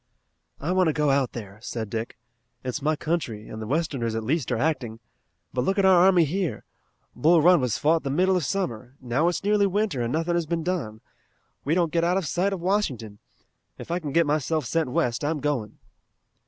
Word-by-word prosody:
"I 160 +5 -2
want 185 -1 +3
to 155 - +2
go 150 -1 +2
out 135 -2 +1
there," 105 -3 -8
said 110 -3 -5
Dick. 115 +1 -4 0.5
"It's 130 +4 -3
my 155 +2 +1
country, 145 -10 -3
and 110 - -7
the 110 - -5
westerners 135 -5 -1
at 115 - -2
least 135 +2 -1
are 120 - +1
acting. 125 -5 -1 0.5
But 125 - 0
look 195 +8 0
at 195 - +3
our 185 -2 +6
army 180 -3 +5
here! 180 +3 -2 0.5
Bull 160 +7 +4
Run 175 0 +5
was 125 -5 0
fought 160 +2 +2
the 140 - -4
middle 185 +7 +2
of 180 - 0
summer. 125 - -3
Now 130 +6 0
it's 175 - -1
nearly 205 0 +3
winter, 200 - -1
and 120 0 -1
nothing 165 +3 0
has 170 -2 0
been 165 0 -1
done. 150 -12 -3 0.6
We 150 +4 +1
don't 170 -3 +1
get 165 -1 +2
out 175 +2 +2
of 190 - -1
sight 180 +6 0
of 195 - -3
Washington. 140 - -1 0.6
If - - -8
I 175 - 0
can 150 -5 -5
get 170 +3 +3
myself 155 +1 0
sent 165 -5 0
west 120 0 0
I'm 150 +1 -1
going." 135 -8 -2
155 Hz, 210 wpm, -25 LUFS, 125-175 Hz, 0.6 s, our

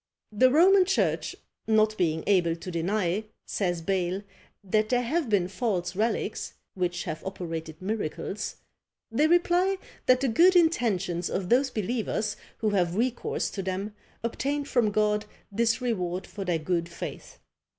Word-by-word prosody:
The 255 +5 +5
Roman 370 +7 +6
church 380 +1 0 0.3
not 215 -1 +3
being 160 -5 0
able 175 -5 +3
to 175 +2 -7
deny, 180 +3 0 0.2
says 175 -4 -1
Bayle, 190 +1 -1 0.4
that 215 +3 +1
there 245 -1 +2
have 300 +2 -1
been 195 -4 +2
false 185 -4 -2
relics, 220 +4 -1 0.2
which 175 -2 -1
have 160 -2 -5
operated 165 -4 -5
miracles, 205 0 -3 0.6
they 290 +7 +3
reply 350 +3 +3 0.3
that 255 0 +5
the 275 - +2
good 345 +11 +5
intentions 200 - +2
of 185 -2 -2
those 265 +3 +4
believers 215 -2 -2 0.2
who 215 -1 0
have 180 -3 +1
recourse 240 +3 -1
to 195 - -4
them 190 +3 -3 0.3
obtained 280 +5 -2
from 240 -6 +2
God 210 0 +1 0.3
this 230 +4 +1
reward 185 -7 -1
for 200 -2 -7
their 175 -2 +1
good 170 +1 -1
faith! 170 - -7
210 Hz, 145 wpm, -27 LUFS, 180-245 Hz, 0.6 s, Roman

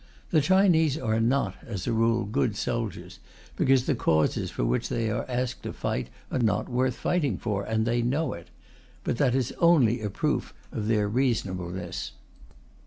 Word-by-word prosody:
The 155 - +4
Chinese 160 -3 +4
are 110 -5 0
not, 125 +5 +1
as 105 - -5
a 120 - 0
rule, 115 +1 +2
good 105 +1 0
soldiers, 115 -1 -4 0.4
because 130 -1 +3
the 150 - +2
causes 80 -10 +1
for - - -2
which - - 0
they 115 -2 -1
are 105 - -2
asked 125 0 -2
to - - -5
fight 65 - -3 0.2
are - - 0
not 110 -4 +1
worth 125 0 0
fighting 145 - 0
for, 105 -3 -2
and 110 +1 0
they 120 +1 +1
know 140 +7 0
it. 85 - -10 0.6
But - - -1
that 130 -2 +2
is 130 -3 0
only 135 -9 +4
a 105 - -2
proof - - -2 0.2
of 105 - -3
their 105 -2 +2
reasonableness. 90 - -2
115 Hz, 175 wpm, -27 LUFS, 105-130 Hz, 0.6 s, The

